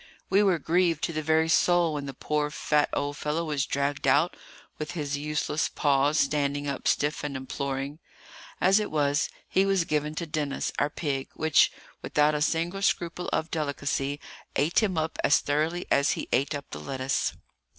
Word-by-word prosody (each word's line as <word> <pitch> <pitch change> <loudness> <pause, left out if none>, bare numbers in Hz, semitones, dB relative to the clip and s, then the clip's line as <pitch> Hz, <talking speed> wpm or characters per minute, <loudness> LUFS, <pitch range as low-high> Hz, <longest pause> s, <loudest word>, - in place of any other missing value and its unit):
We 195 +1 +5
were 190 -4 +3
grieved 165 -1 +1
to 165 - -1
the 155 - -1
very 160 +1 +2
soul 175 0 +3
when 145 -1 -4
the 135 - -7
poor 150 +1 -1
fat 150 0 +1
old 145 0 -2
fellow 155 +3 -1
was 150 -2 -1
dragged 140 0 -1
out, 145 +6 +3 0.4
with 155 +3 -4
his 145 -4 -2
useless 150 +1 -1
paws 145 +1 +2
standing 145 0 0
up 140 -1 -3
stiff 150 +2 +1
and 145 -2 -3
imploring. 135 +2 -4 0.6
As 190 +3 +5
it 210 - -2
was, 145 -1 +1 0.2
he 190 - +3
was 195 -3 +2
given 150 0 -1
to 170 - -3
Denis, 150 -3 -2
our 145 - +2
pig, 140 -3 -3
which, 160 -1 +4 0.3
without 150 +1 +2
a 150 - -1
single 170 +5 0
scruple 175 -2 0
of 160 - -1
delicacy, 145 -2 -2 0.4
ate 155 +9 +3
him 195 -5 0
up 160 0 -2
as 140 - +5
thoroughly 155 +5 -1
as 140 +1 +4
he - - -5
ate 140 +3 +1
up 140 - -7
the 75 - -6
lettuce. 130 - -1
150 Hz, 180 wpm, -27 LUFS, 140-165 Hz, 0.6 s, We